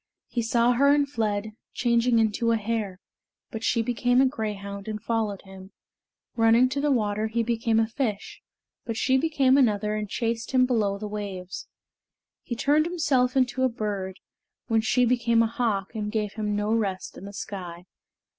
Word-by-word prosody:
He 240 - -1
saw 235 +1 +2
her 265 +3 +3
and 285 0 +4
fled, 215 -5 -2 0.2
changing 235 0 +2
into 225 +1 +1
a 230 - +3
hare; 210 -3 -3 0.5
but 225 0 -6
she 230 - +1
became 245 +2 +1
a 270 - +6
greyhound 200 -5 -4
and 215 -1 -4
followed 215 -3 -2
him. 190 0 -13 0.6
Running 230 +2 +5
to 280 +2 -2
the 295 - +1
water, 215 -3 0
he 230 +1 -1
became 230 -1 +1
a 225 - +3
fish; 225 -4 -4 0.4
but 230 -2 -4
she 260 +3 +2
became 270 -2 +3
another 210 -4 +2
and 215 -1 -3
chased 230 +2 -2
him 255 -1 +5
below 215 -6 0
the 210 +1 -5
waves. 195 -3 -6 0.7
He 240 - -5
turned 295 +6 +2
himself 270 -7 +1
into 260 0 +1
a 260 - +3
bird, 205 -4 -4 0.5
when 225 -1 +2
she 245 +3 +2
became 235 -1 +3
a - - +2
hawk 220 -4 -1
and 210 -2 -3
gave 210 -2 -2
him 210 -1 -2
no 210 +1 0
rest 200 -5 -2
in 195 - -10
the 200 - -8
sky. 180 -3 -7
225 Hz, 175 wpm, -26 LUFS, 210-245 Hz, 0.7 s, a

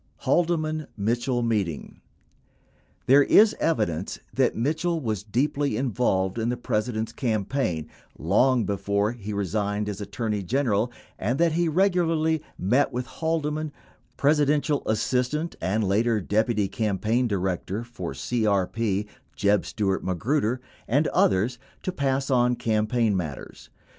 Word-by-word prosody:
HAEDEMAN 155 -3 +1
MITCHELE 120 +4 0
MEETING 100 -9 -2 1.0
There 140 +3 +7
is 210 +9 +6
evidence 105 - 0 0.2
that 130 -2 +2
Mitchell 160 +7 0
was 110 -8 -2
deeply 135 +4 0
involved 115 -6 0
in 115 +1 0
the 125 - -1
Presi 115 0 -1
dent's 110 +1 -3
campaign 110 - -1 0.3
long 115 - +3
before 100 +1 0
he 105 -3 -7
resigned 105 +1 -1
as 105 0 -4
Attorney 105 0 -2
General, 115 +1 0 0.3
and 120 +7 0
that 170 0 +3
he 170 +1 +1
regularly 165 -3 +2 0.2
met 125 +10 +2
with 125 +1 -3
Haldeman, 155 0 -2 0.5
Presidential 145 0 +2
assistant 125 +8 0
(and 105 +4 0
later 110 +3 +2
deputy 105 +1 +1
campaign 110 +4 0
director 95 +1 -2
for 95 - -6
CRP) 105 - 0 0.3
Jeb 100 0 +2
Stuart 95 -3 -1
Magruder 120 - 0 0.3
and 140 +7 +2
others 110 +6 +2 0.2
to 185 - -1
pass 135 -4 -1
on 125 -1 +3
campaign 110 -1 +1
matters. 80 -7 -6
115 Hz, 125 wpm, -25 LUFS, 100-140 Hz, 1.0 s, There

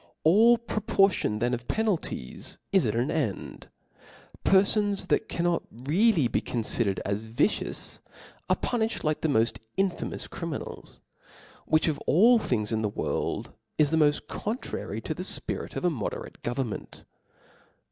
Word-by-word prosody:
All 220 +9 +6
proportion 195 - +1
then 120 +3 0
of 120 0 -4
penalties 205 - -2
is 190 -10 +4
at 105 - -1
an 120 +4 +1
end. 120 - -3 0.7
Perfons 200 +1 +3
that - - +1
cannot 170 0 +1
really 155 - +2
be - - 0
confidered 115 -4 0
as 100 +2 -2
vicious, 115 - -1 0.5
are - - +4
punilhed 230 -2 -1
like 155 -1 0
the - - +1
moft 115 -4 +2 0.2
infamous 190 -2 -1
criminals*, 165 -5 -6 0.7
yrhich 155 +1 +4
of 155 -3 0
all 230 +8 +6
things 110 - -1
in 110 -1 0
the 105 - 0
world - - -2 0.2
is 150 -1 +3
the 160 - +3
moft 150 -2 +3
con 215 +4 -3
trary - - -5
to - - -2
the - - -6
fpirit - - -2
of - - -2
a 175 - +3
moderate 125 -9 -5
government. 120 -3 -4
155 Hz, 145 wpm, -27 LUFS, 115-195 Hz, 0.7 s, All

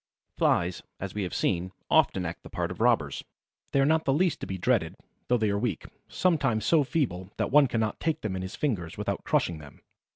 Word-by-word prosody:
Flies, 85 +1 +1 0.2
as 95 -1 -5
we 105 - -3
have 90 - -3
seen, 90 0 0 0.2
often 90 - +3
act 85 - -5
the - - -12
part - - -2
of - - -7
robbers. - - +2 0.5
They 140 - +2
are - - +4
not 160 +2 +3
the 135 - +3
least 175 +2 +1
to - - -5
be 95 - -4
dreaded, 95 -4 +1 0.3
though 125 - +3
they 110 -3 +1
are 100 - 0
weak, 105 -7 -2 0.2
sometimes 135 -11 +1
so 160 -3 +4
feeble 115 - -2
that - - -1
one 145 0 +6
cannot 110 -3 -1
take 160 -1 -1
them 105 -3 -3
in 95 - -3
his 95 0 -6
fingers 100 - -2
without - - -3
crushing 85 -3 0
them. 75 -2 -14
110 Hz, 220 wpm, -28 LUFS, 90-140 Hz, 0.5 s, one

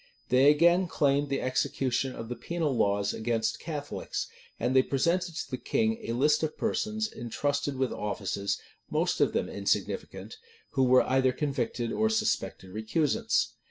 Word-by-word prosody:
They 130 +3 +6
again 170 +5 +4
claimed 145 -2 +1
the 135 - -1
execution 130 0 0
of 115 - -6
the 125 - -4
penal 165 -4 -2
laws 100 -2 +1
against 115 0 -1
Catholics; 145 -3 -4 0.3
and 125 +3 0
they 130 - +8
presented 170 +6 0
to - - -5
the 130 - -3
king 225 0 0
a - - 0
list 150 +5 +3
of 155 -1 -2
persons 220 -1 -1
intrusted 140 +4 -2
with 130 -1 0
offices, 100 -1 -2 0.3
most 170 +3 0
of - - +3
them - - 0
insignificant - - -2 0.3
who 135 -1 +2
were 130 0 +6
either 130 0 +2
convicted 125 -4 -2
or 220 0 +1
suspected 215 - -1
recusants. 110 - +1
135 Hz, 155 wpm, -29 LUFS, 120-165 Hz, 0.3 s, they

